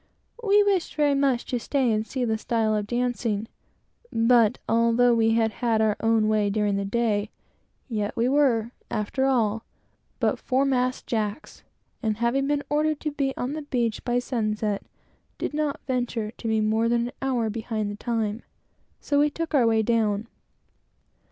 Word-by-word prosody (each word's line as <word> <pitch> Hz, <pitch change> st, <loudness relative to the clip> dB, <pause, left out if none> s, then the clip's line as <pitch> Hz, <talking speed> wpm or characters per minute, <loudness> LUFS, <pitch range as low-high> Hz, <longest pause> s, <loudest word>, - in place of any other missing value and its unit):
We 415 Hz, -2 st, +4 dB
wished 395 Hz, -4 st, 0 dB
very 295 Hz, -2 st, +3 dB
much 275 Hz, -3 st, +1 dB
to 245 Hz, -, -2 dB
stay 260 Hz, +1 st, +1 dB
and 215 Hz, 0 st, -1 dB
see 255 Hz, -2 st, -2 dB
the 220 Hz, -1 st, 0 dB
style 225 Hz, -1 st, 0 dB
of 210 Hz, -1 st, -2 dB
dancing; 240 Hz, -3 st, -1 dB, 0.6 s
but, 230 Hz, -1 st, +4 dB
although 235 Hz, +1 st, +3 dB
we 225 Hz, -1 st, +3 dB
had 225 Hz, -1 st, +2 dB
had 230 Hz, -1 st, 0 dB
our 215 Hz, -1 st, +2 dB
own 225 Hz, -1 st, +2 dB
way 215 Hz, -1 st, +2 dB
during 205 Hz, -1 st, 0 dB
the 200 Hz, 0 st, -1 dB
day, 210 Hz, -1 st, 0 dB, 0.6 s
yet 210 Hz, -4 st, -3 dB
we 230 Hz, +1 st, +2 dB
were, 255 Hz, -5 st, +2 dB, 0.2 s
after 225 Hz, +5 st, -1 dB
all, 225 Hz, -4 st, +1 dB, 0.6 s
but -, -, +1 dB
'foremast 255 Hz, -1 st, 0 dB
Jacks; 215 Hz, +4 st, -3 dB, 0.4 s
and 215 Hz, -3 st, -1 dB
having 240 Hz, +4 st, +1 dB
been 290 Hz, 0 st, 0 dB
ordered 300 Hz, +1 st, +1 dB
to 305 Hz, -, -2 dB
be 275 Hz, -2 st, -2 dB
on 250 Hz, +3 st, -2 dB
the 310 Hz, -, -4 dB
beach 240 Hz, -6 st, -2 dB
by 245 Hz, 0 st, 0 dB
sundown, 215 Hz, -4 st, -1 dB, 0.6 s
did -, -, -3 dB
not 300 Hz, -1 st, -1 dB
venture 245 Hz, -4 st, -2 dB
to 230 Hz, -, -8 dB
be 220 Hz, -1 st, +2 dB
more 220 Hz, +2 st, +1 dB
than 235 Hz, 0 st, +1 dB
an -, -, -14 dB
hour 245 Hz, -5 st, 0 dB
behind 215 Hz, -1 st, -3 dB
the -, -, -6 dB
time; 225 Hz, -1 st, -2 dB, 0.6 s
so 285 Hz, -1 st, 0 dB
we 295 Hz, +1 st, +4 dB
took 330 Hz, +2 st, -5 dB
our 255 Hz, -5 st, +4 dB
way 220 Hz, -1 st, +3 dB
down. 215 Hz, -2 st, +1 dB
235 Hz, 170 wpm, -25 LUFS, 220-265 Hz, 0.6 s, We